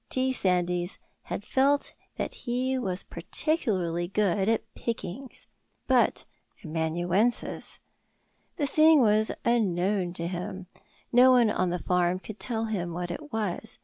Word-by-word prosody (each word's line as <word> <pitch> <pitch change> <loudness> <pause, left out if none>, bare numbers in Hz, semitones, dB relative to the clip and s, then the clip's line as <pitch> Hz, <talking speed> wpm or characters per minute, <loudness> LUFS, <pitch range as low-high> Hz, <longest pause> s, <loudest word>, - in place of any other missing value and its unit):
T. 260 0 +1
Sandys 180 -3 0 0.3
had - - -4
felt 280 +3 +2 0.2
that - - -3
he 255 +2 -2
was 190 -5 -2
particularly 185 - -1
good 195 0 +1
at 225 0 -1
pickings. 235 +2 -5 0.4
But - - +2 0.4
amanuensis? 175 +8 0 0.8
The 295 - +1
thing 310 +1 +5
was 215 0 +3
unknown 195 -5 +1
to 170 -1 -4
him; 180 +1 -5 0.5
no 250 +2 +7
one 245 -4 +5
on 185 -3 0
the 175 - -1
farm 180 0 +1
could 210 +3 -10
tell 225 -2 -2
him 180 -6 -3
what 175 0 -4
it 295 - -7
was. 220 -1 -3
205 Hz, 130 wpm, -27 LUFS, 175-245 Hz, 0.8 s, no